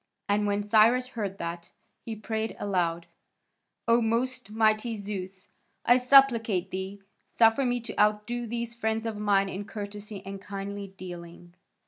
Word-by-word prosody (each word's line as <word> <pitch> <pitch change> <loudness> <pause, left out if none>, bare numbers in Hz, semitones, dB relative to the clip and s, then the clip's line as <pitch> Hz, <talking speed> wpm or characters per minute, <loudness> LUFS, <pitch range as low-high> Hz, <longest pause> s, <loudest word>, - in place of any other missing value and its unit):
And 205 +1 +2
when 205 0 0
Cyrus 230 +4 +4
heard 205 -6 -4
that, 170 -1 -6 0.3
he 225 - -5
prayed 220 +1 -3
aloud: 170 -4 0 0.8
"O 230 +1 +5
most 235 +1 -1
mighty 220 +1 +2
Zeus, 195 -2 -6 0.4
I 245 - +6
supplicate 235 -8 +5
thee, 190 +1 -5 0.2
suffer 225 +4 +3
me 245 0 +1
to 225 -1 -2
outdo 210 +3 +1
these 235 +1 -3
friends 220 -1 -1
of 225 -1 -2
mine 205 -2 +2
in 195 +1 -5
courtesy 205 -1 -7
and 195 0 -7
kindly 200 0 -6
dealing." 175 -1 -9
210 Hz, 140 wpm, -28 LUFS, 195-230 Hz, 0.8 s, I